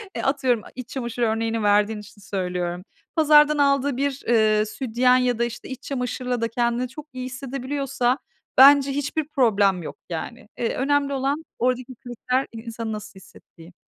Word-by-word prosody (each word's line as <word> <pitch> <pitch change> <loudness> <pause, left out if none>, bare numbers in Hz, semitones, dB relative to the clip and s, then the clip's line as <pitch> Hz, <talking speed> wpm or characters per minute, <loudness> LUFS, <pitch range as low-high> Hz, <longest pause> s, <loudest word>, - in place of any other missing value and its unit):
eee, - - -2
atıyorum 260 -4 +1
e - - -11
iç 255 -1 -8
çamaşır 240 -2 -4
örneğini 225 0 0
verdiğin 210 +1 +3
için 205 0 -14
söylüyorum. 180 -2 -3 0.3
Pazardan 300 -1 +5
aldığı 280 -2 +2
bir, 280 0 -2
eee, 215 -2 +3
sütyen 245 +3 +2
ya 250 -2 +1
da, - - +3
işte, 235 0 -5
iç 260 -1 -7
çamaşırla 250 -2 -3
da 230 - +1
kendini 240 +2 0
çok 295 +4 -10
iyi 255 0 -5
hissedebiliyorsa 265 0 -2 0.4
bence 280 +1 +8
hiçbir 285 +2 -2
problem 205 - +2
yok, - - -7
yani. 215 +8 -6
Eee, 230 - -1
önemli 280 +1 +1
olan 275 +3 -1 0.2
oradaki 255 +1 -1
kriter 250 +2 -2
i - - -8
insanın 230 -1 -5
nasıl 210 -1 -8
hissettiği. 170 -2 -17
250 Hz, 165 wpm, -23 LUFS, 220-275 Hz, 0.4 s, bence